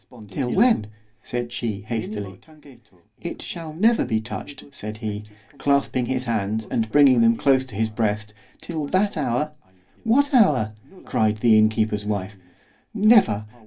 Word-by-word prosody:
——Till 125 +5 -3
when? 225 - +3 0.3
said 120 -1 -4
she 110 -4 -3
hastily. 105 -3 -5 0.8
It - - -6
never 170 +8 +1
shall - - +1
be 110 - +1
touched, 120 +5 -8
said 105 +1 -7
he, 105 -1 -5 0.3
clasping 140 -3 +1
his 130 0 -1
hands 110 -2 -2
and 110 -2 -1
bringing 135 -4 +6
them 115 0 +5
close 130 +1 +2
to 125 -6 -12
his 110 +1 -1
breast, 105 -1 -2 0.3
till 155 -4 -4
that 195 +5 +1
hour—What 150 - -2
hour? 145 - +4 0.3
cried 110 -1 +1
the 110 0 +4
inn 110 0 +5
keeper's 110 -2 -1
wife.—Never! 105 - 0
115 Hz, 135 wpm, -23 LUFS, 105-145 Hz, 0.8 s, bringing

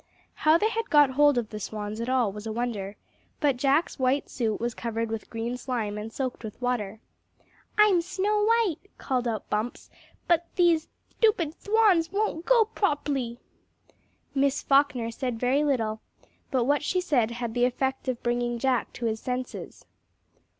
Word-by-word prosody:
How 310 +1 +4
they 425 +5 +1
had 455 0 -3
got 295 -3 +6
hold 290 0 +4
of 230 -3 -1
the 215 - -5
swans 210 +1 -5
at 235 - -3
all 250 -5 +2
was 210 +2 -8
a - - -3
wonder, 215 -4 -3 0.4
but 285 -4 +2
Jack's 275 +5 +1
white 260 +2 +1
suit 225 -4 -1
was 235 0 -2
covered 230 -1 -3
with 225 -1 -5
green 235 +2 -3
slime 235 -5 -3
and 210 +1 -6
soaked 255 -1 -4
with 215 -2 -8
water. 225 -5 -2 0.8
"I'm 420 -4 +5
Snow 415 +4 0
White," 445 -7 +2 0.2
called 250 -3 -1
out 220 -2 -3
Bumps, 215 +4 -3 0.4
"but 340 0 +2
these 340 -3 +3 0.3
thtupid 360 -9 +3
thwans 405 -4 +3
won't 395 -5 -1
go 475 -3 +5
prop'ly!" 285 - -1 1.0
Miss 275 0 +1
Falkner 275 -4 +2
said 245 -1 -3
very 260 +4 +2
little, 225 -7 0 0.5
but 255 -3 +1
what 285 +4 +2
she 365 +5 0
said 275 -11 +1
had 235 -1 -4
the 245 +1 +3
effect 265 +2 -1
of 250 -2 -2
bringing 240 0 0
Jack 255 0 0
to 240 - -5
his 220 -1 -1
senses. 250 +1 -5
255 Hz, 165 wpm, -27 LUFS, 230-310 Hz, 1.0 s, got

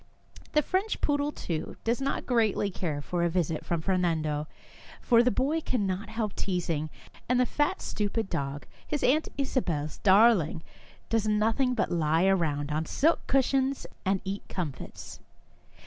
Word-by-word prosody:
The 300 - +4
French 385 +4 -1
poodle, 290 0 +1
too, 165 - -4
does 235 +3 0
not 275 - -1
greatly 220 -4 +1
care 155 -6 -3
for 175 +2 -2
a 170 - +2
visit 165 -2 -1
from 170 -2 -1
Fernando, 160 -5 0 0.5
for 235 -2 +4
the 245 - +3
boy 280 +8 0
cannot 205 -6 -2
help 220 -2 -3
teasing, 170 -5 -1 0.4
and 250 0 +3
the 250 - +4
fat, 300 +9 0
stupid 210 +1 -2
dog, 140 -5 -3 0.2
his 295 - -2
Aunt 305 +5 +3
Isabel's 170 - -1
darling, 190 -5 +4 0.5
does 225 -2 +1
nothing 225 +5 +2
but 220 - 0
lie 165 +1 +2
around 155 -6 +1
on 155 +2 -1
silken 325 +5 +2
cushions 270 0 +1 0.2
and 190 0 +1
eat 195 +1 -3
comfits. 155 -8 -6
200 Hz, 150 wpm, -28 LUFS, 165-250 Hz, 0.5 s, The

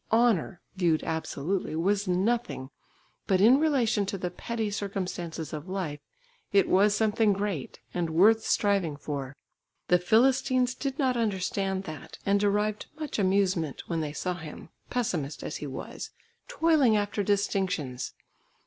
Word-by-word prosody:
Honour, 220 -6 +2 0.2
viewed 170 -4 +2
absolutely, 160 +2 -2
was 200 +5 +1
nothing, 180 - 0 0.6
but 190 -3 +3
in 240 +7 +6
relation 255 -9 +2
to 195 - -2
the 180 -1 -3
petty 220 +2 -3
circumstances 180 -6 -4
of 155 +4 -6
life 180 -6 -3 0.5
it 200 -1 +4
was 205 +2 +4
something 215 0 +3
great, 195 -8 -3
and 175 -2 -1
worth 215 +7 +5
striving 195 -10 +1
for. 140 -2 -5 0.5
The 180 - +5
Philistines 255 +5 +3
did 270 0 -4
not 260 -4 +1
understand 195 -3 -1
that, 155 -5 -9
and 200 0 +3
derived 210 +1 0
much 305 -7 -3
amusement, 185 -6 +1
when 165 -2 -2
they 150 -2 -3
saw 180 +4 -2
him, 160 -2 -9 0.2
pessimist 160 - -2
as - - -4
he 150 - -6
was, 130 - -6 0.4
toiling 320 - +3
after 205 0 -1
distinctions. 190 -10 -1
195 Hz, 140 wpm, -28 LUFS, 165-220 Hz, 0.6 s, in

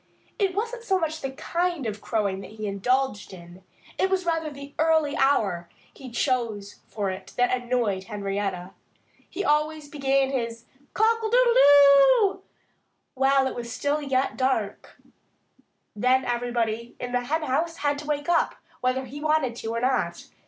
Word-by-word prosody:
It 390 -3 +1
wasn't 465 +3 -3
so 390 -4 +1
much 315 -2 -3
the 270 - -3
kind 340 +2 -2
of 215 -1 -4
crowing 200 -4 -1
that 205 - -11
he 215 -1 -6
indulged 210 +2 -1
in; 175 0 -13 0.4
it 380 - +2
was 375 -1 0
rather 325 -2 -1
the 280 0 -11
early 315 -2 +2
hour 195 -11 +1 0.2
he 265 - -10
chose 230 -5 -2
for 200 -3 -3
it 185 - -9
that 245 0 +2
annoyed 240 -6 -1
Henrietta. 195 -3 -3 0.6
He 390 +2 -4
always 300 0 +1
began 275 -1 +1
his 230 -3 -3 0.3
Cockle 445 0 +2
doodle 485 +1 +4
doo 285 - +6 0.7
while 270 0 +3
it 265 - -2
was 235 -1 -7 0.2
yet 265 0 0
dark. 255 -6 -2 1.0
Then 255 +4 +2
everybody 235 -1 -2
in 245 - -5
the 245 0 +1
henhouse 315 +3 -1
had 290 -1 0
to 300 - -9
wake 290 -1 -2
up, 340 -1 +2 0.2
whether 255 +1 0
he 280 +4 -9
wanted 305 -6 +1
to 225 - -6
or 230 0 -2
not. 245 -10 -1
265 Hz, 150 wpm, -25 LUFS, 225-310 Hz, 1.0 s, doo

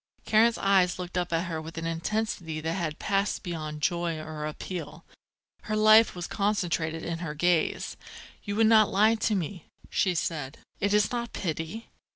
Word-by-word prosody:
Karen's 225 +2 +4
eyes 190 -3 +3
looked 180 0 -6
up 180 -1 -1
at 165 +1 0
her 165 -2 -4
with 165 +1 -9
an 165 - -3
intensity 165 -1 -2
that 160 +1 -2
had 165 -4 -3
passed 200 0 0
beyond 155 -4 -5
joy 170 -1 0
or 155 -1 -5
appeal. 170 +3 -7 0.6
Her 215 - -1
life 215 0 +6
was 175 -1 -4
concentrated 175 -6 -1
in 165 -1 -3
her 155 -4 -5
gaze. 175 0 +1 0.5
"You 205 -1 -3
would 225 +1 +4
not 220 -1 +6
lie 215 +3 +4
to 215 -1 0
me?" 180 -1 -4 0.2
she 185 -2 +1
said. 150 -4 -3 0.2
"It 200 - +1
is 210 +1 +3
not 235 -1 -3
pity? 165 +5 -4
175 Hz, 175 wpm, -28 LUFS, 160-210 Hz, 0.6 s, life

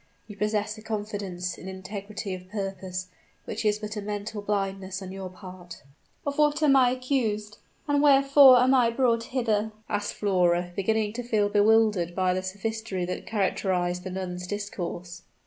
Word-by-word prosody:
You 210 - -9
possess 210 +1 -1
a - - -11
confidence 205 -4 -4
in 185 - -9
integrity 195 +1 -6
of 185 0 -9
purpose, 190 -2 -4 0.4
which - - -4
is 210 -1 +2
but 215 0 -6
a 210 - -3
mental 205 +1 -4
blindness 195 -2 -2
on 190 -1 -8
your 190 -1 -6
part." 180 -2 -11 0.4
"Of 285 +1 -2
what 300 +1 +3
am 280 -2 +5
I 255 -2 +6
accused? 240 -5 -1 0.3
and 290 -1 +2
wherefore 275 -2 +7
am 255 +2 +4
I 245 -3 +5
brought 230 -1 +1
hither?" 220 -4 0 0.2
asked 205 0 -2
Flora, 175 -3 +1
beginning 210 +1 0
to 245 +1 -4
feel 215 -4 +1
bewildered 210 -4 +3
by 185 -1 +2
the 185 - -1
sophistry 200 0 -3
that 180 - -5
characterized 180 -3 0
the 190 - -5
nun's 180 -1 -5
discourse. 180 -3 -5
205 Hz, 165 wpm, -27 LUFS, 185-225 Hz, 0.4 s, wherefore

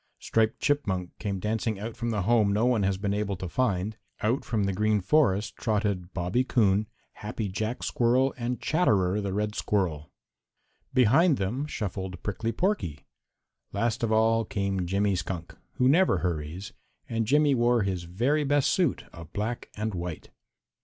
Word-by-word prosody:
Striped 110 0 0
Chipmunk 95 -11 0
came 100 -2 -3
dancing 110 +1 -1
out 110 +2 -5
from 120 -1 -3
the 105 -4 -1
home 110 -1 +3
no 105 +4 +2
one 125 -4 +2
has 95 -1 +1
been 100 0 -1
able 100 -1 -1
to 95 0 -5
find. 100 -1 -1 0.2
Out 115 +6 +1
from 110 -4 -1
the 100 0 0
Green 105 +2 +2
Forest 105 -2 +2
trotted 100 -4 -1
Bobby 90 +8 0
Coon, 105 -4 +2 0.3
Happy 105 0 -4
Jack 110 +5 -3
Squirrel 125 +3 +2
and 125 0 -3
Chatterer 105 - +2
the 100 -1 -3
Red 105 +2 -1
Squirrel. 90 -9 -1 0.8
Behind 135 +6 +4
them 120 +10 -2
shuffled 95 -7 -5
Prickly 110 +3 -2
Porky. 115 - -1 0.7
Last 115 -1 0
of 115 -2 0
all 115 +1 +3
came 100 -3 -2
Jimmy 100 +2 +1
Skunk, 90 -1 -5 0.2
who 125 - +2
never 165 - +4
hurries, 85 +2 -3 0.3
and 115 -1 -1
Jimmy 145 +2 +4
wore 120 -2 +3
his 95 -3 -2
very 125 - +1
best 145 0 +2
suit 175 -7 +1
of 85 -1 -11
black 110 +4 -3
and 110 0 -2
white. 85 -2 -6
105 Hz, 160 wpm, -27 LUFS, 95-120 Hz, 0.8 s, Behind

